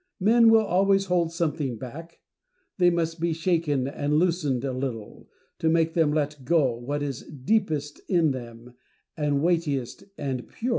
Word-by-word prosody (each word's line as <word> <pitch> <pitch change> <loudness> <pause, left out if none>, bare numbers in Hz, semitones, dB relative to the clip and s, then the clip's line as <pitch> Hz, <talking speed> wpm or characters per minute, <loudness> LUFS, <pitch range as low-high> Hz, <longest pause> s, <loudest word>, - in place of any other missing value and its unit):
Men 225 +4 +5
will 225 -1 +5
always 195 +1 +2
hold 175 -3 +1
something 155 -7 -2
back; 160 +9 -10 0.6
they 175 -1 +6
must 165 -1 -1
be 170 0 0
shaken 160 -5 0
and 145 +1 -1
loosened 155 -7 +1
a 135 - -2
little, 125 -5 -6 0.3
to 160 - +1
make 165 0 +2
them 160 -3 +2
let 150 -2 -2
go 140 -5 +2
what 140 +5 -4
is 140 -4 -4
deepest 150 -1 -1
in 170 -5 +3
them, 120 -1 -8 0.4
and 145 -2 0
weightiest 150 -8 -1
and 130 -4 -4
purest. 240 - -4
155 Hz, 155 wpm, -25 LUFS, 135-170 Hz, 0.6 s, they